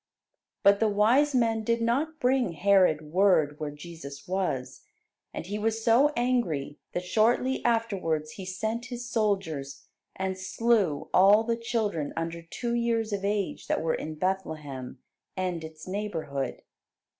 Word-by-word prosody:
But 200 Hz, 0 st, +6 dB
the 225 Hz, -, +3 dB
wise 245 Hz, +8 st, +3 dB
men 225 Hz, -2 st, +2 dB
did 230 Hz, +1 st, +1 dB
not 280 Hz, +8 st, 0 dB
bring 250 Hz, -, +2 dB
Herod 180 Hz, -3 st, +4 dB
word 175 Hz, -6 st, +3 dB
where 155 Hz, -1 st, -3 dB
Jesus 145 Hz, -2 st, -10 dB
was; 180 Hz, -9 st, -2 dB, 0.5 s
and -, -, -6 dB
he 205 Hz, +3 st, -4 dB
was 225 Hz, +1 st, -1 dB
so 250 Hz, +7 st, +5 dB
angry 210 Hz, -, 0 dB
that 180 Hz, -, -3 dB
shortly 235 Hz, +6 st, +2 dB
afterwards 195 Hz, -10 st, 0 dB
he 190 Hz, -, -8 dB
sent 220 Hz, +6 st, -3 dB
his 245 Hz, -1 st, -6 dB
soldiers, 165 Hz, -, -1 dB, 0.3 s
and 190 Hz, 0 st, -3 dB
slew 195 Hz, -4 st, +1 dB
all 200 Hz, +4 st, +6 dB
the 230 Hz, 0 st, 0 dB
children 215 Hz, -9 st, -2 dB
under 165 Hz, 0 st, -3 dB
two 235 Hz, +8 st, -4 dB
years 230 Hz, -2 st, 0 dB
of 200 Hz, -1 st, -2 dB
age 200 Hz, -1 st, -2 dB
that -, -, 0 dB
were 160 Hz, -, +1 dB
in 155 Hz, 0 st, -4 dB
Bethlehem 155 Hz, -8 st, -3 dB, 0.4 s
and 180 Hz, -3 st, -2 dB
its 160 Hz, +1 st, -10 dB
neighbourhood. 160 Hz, -10 st, -3 dB
195 Hz, 145 wpm, -28 LUFS, 160-230 Hz, 0.5 s, But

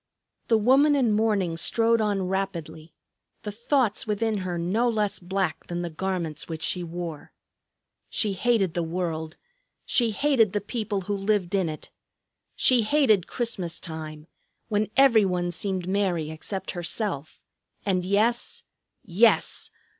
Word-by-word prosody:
The 225 Hz, -, +4 dB
woman 270 Hz, +7 st, +5 dB
in 255 Hz, -5 st, +2 dB
mourning 210 Hz, -6 st, +1 dB
strode 230 Hz, +6 st, +2 dB
on 205 Hz, -3 st, 0 dB
rapidly, 175 Hz, -4 st, -4 dB, 0.5 s
the 210 Hz, -, -4 dB
thoughts 235 Hz, 0 st, 0 dB
within 215 Hz, +1 st, 0 dB
her 180 Hz, -2 st, -3 dB
no 200 Hz, +9 st, +1 dB
less 210 Hz, -3 st, 0 dB
black 185 Hz, -2 st, -2 dB
than 175 Hz, 0 st, -3 dB
the 170 Hz, -, -4 dB
garments 170 Hz, -3 st, -3 dB
which 160 Hz, -1 st, -5 dB
she 180 Hz, -, 0 dB
wore. 170 Hz, -2 st, -6 dB, 0.8 s
She 210 Hz, -3 st, 0 dB
hated 195 Hz, -4 st, +1 dB
the 175 Hz, -, -1 dB
world; 165 Hz, -2 st, -3 dB, 0.5 s
she 235 Hz, -2 st, +2 dB
hated 225 Hz, -2 st, +2 dB
the 205 Hz, -, +1 dB
people 210 Hz, -2 st, -3 dB
who 205 Hz, +2 st, -2 dB
lived 195 Hz, -2 st, 0 dB
in 190 Hz, -4 st, +1 dB
it. 155 Hz, -, -8 dB, 0.6 s
She 250 Hz, -2 st, +4 dB
hated 220 Hz, -, +3 dB
Christmas 225 Hz, -9 st, -2 dB
time, 155 Hz, -2 st, -7 dB, 0.4 s
when 210 Hz, -1 st, 0 dB
every 260 Hz, -6 st, +6 dB
one 180 Hz, -2 st, 0 dB
seemed 185 Hz, 0 st, -3 dB
merry 185 Hz, -5 st, 0 dB
except 190 Hz, +5 st, -5 dB
herself. 175 Hz, -3 st, -3 dB, 0.5 s
And 185 Hz, -3 st, +1 dB
yes, 215 Hz, +6 st, 0 dB, 0.4 s
yes! 215 Hz, +5 st, +2 dB
195 Hz, 140 wpm, -26 LUFS, 175-220 Hz, 0.8 s, every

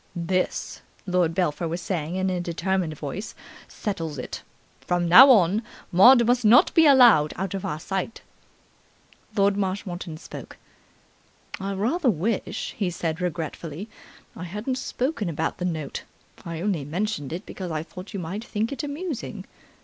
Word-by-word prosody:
"This," 180 Hz, +2 st, -2 dB, 0.2 s
Lord 180 Hz, -3 st, +1 dB
Belpher 170 Hz, -2 st, 0 dB
was 170 Hz, +2 st, -3 dB
saying 175 Hz, -2 st, -3 dB
in 190 Hz, 0 st, 0 dB
a 180 Hz, -1 st, -1 dB
determined 175 Hz, -1 st, -2 dB
voice, 165 Hz, +10 st, -6 dB, 0.3 s
"settles 165 Hz, -8 st, -4 dB
it. 125 Hz, -, -6 dB, 0.4 s
From 175 Hz, -1 st, -1 dB
now 240 Hz, +11 st, +10 dB
on 205 Hz, -3 st, +5 dB, 0.3 s
Maud 235 Hz, +7 st, +7 dB
must 245 Hz, +1 st, +2 dB
not 225 Hz, +3 st, +6 dB
be 325 Hz, -2 st, +6 dB
allowed 240 Hz, -, +6 dB
out 190 Hz, 0 st, -3 dB
of 195 Hz, -, -4 dB
our 150 Hz, -, -3 dB
sight." 190 Hz, +5 st, -4 dB, 1.1 s
Lord 200 Hz, -1 st, +3 dB
Marshmoreton 185 Hz, -4 st, -3 dB
spoke. -, -, -10 dB, 1.0 s
"I 195 Hz, +1 st, -3 dB
rather 250 Hz, -, +1 dB
wish," 205 Hz, +3 st, -2 dB
he 195 Hz, -4 st, -1 dB
said 165 Hz, -1 st, -3 dB
regretfully, 170 Hz, +2 st, -4 dB, 0.5 s
"I 180 Hz, -, -6 dB
hadn't 210 Hz, +9 st, -3 dB
spoken 255 Hz, -, -2 dB
about 160 Hz, 0 st, -2 dB
the 180 Hz, -, -2 dB
note. 160 Hz, -5 st, -3 dB, 0.4 s
I 165 Hz, -1 st, -5 dB
only 185 Hz, -6 st, -1 dB
mentioned 155 Hz, -1 st, -3 dB
it 175 Hz, +5 st, -5 dB
because 185 Hz, -2 st, -6 dB
I 155 Hz, -1 st, -2 dB
thought 180 Hz, +4 st, -10 dB
you 200 Hz, -, -4 dB
might 185 Hz, +6 st, -5 dB
think 220 Hz, +1 st, -2 dB
it 270 Hz, -2 st, -4 dB
amusing." 285 Hz, -, -5 dB
185 Hz, 150 wpm, -25 LUFS, 165-215 Hz, 1.1 s, now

